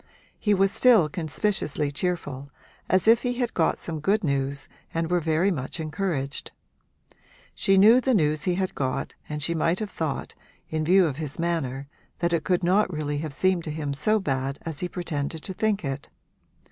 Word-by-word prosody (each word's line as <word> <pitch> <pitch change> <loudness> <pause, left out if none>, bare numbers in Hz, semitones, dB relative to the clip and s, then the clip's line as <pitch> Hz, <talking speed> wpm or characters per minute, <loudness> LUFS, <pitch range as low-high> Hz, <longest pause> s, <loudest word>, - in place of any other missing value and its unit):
He 210 -2 +2
was 195 0 +3
still 225 -11 +5
conspicuously 155 -3 -1
cheerful, 145 -4 -3 0.4
as 185 +2 +3
if 230 +1 +6
he 245 -1 -1
had 245 -2 -1
got 165 - +2
some 160 -2 -4
good 200 +7 +1
news 140 -2 -1 0.2
and 165 +1 -2
were 180 - +3
very 165 +4 +2
much 135 0 -4
encouraged. 155 -3 -3 1.0
She 195 0 +2
knew 225 +6 +7
the 260 -1 +2
news 155 -4 +2
he 180 -2 +1
had 190 0 -1
got 130 -2 -2 0.2
and 150 -1 -4
she 170 - 0
might 165 +2 +1
have 210 -1 -4
thought, 160 -3 -3 0.4
in 155 0 -1
view 185 +3 +5
of 145 -4 -2
his 150 -3 -4
manner, 140 -6 -2 0.3
that 170 0 0
it 165 -2 +1
could 180 -1 +1
not 185 +3 +3
really 145 -2 -2
have 155 -1 -4
seemed 180 +4 +1
to - - -4
him 150 -2 -3
so 215 +10 +2
bad 135 -5 -2
as 160 -4 -5
he - - -2
had 175 - -6
pretended 160 -3 -3
to 190 - -5
think 210 -3 0
it. 135 0 -4
165 Hz, 190 wpm, -26 LUFS, 145-190 Hz, 1.0 s, knew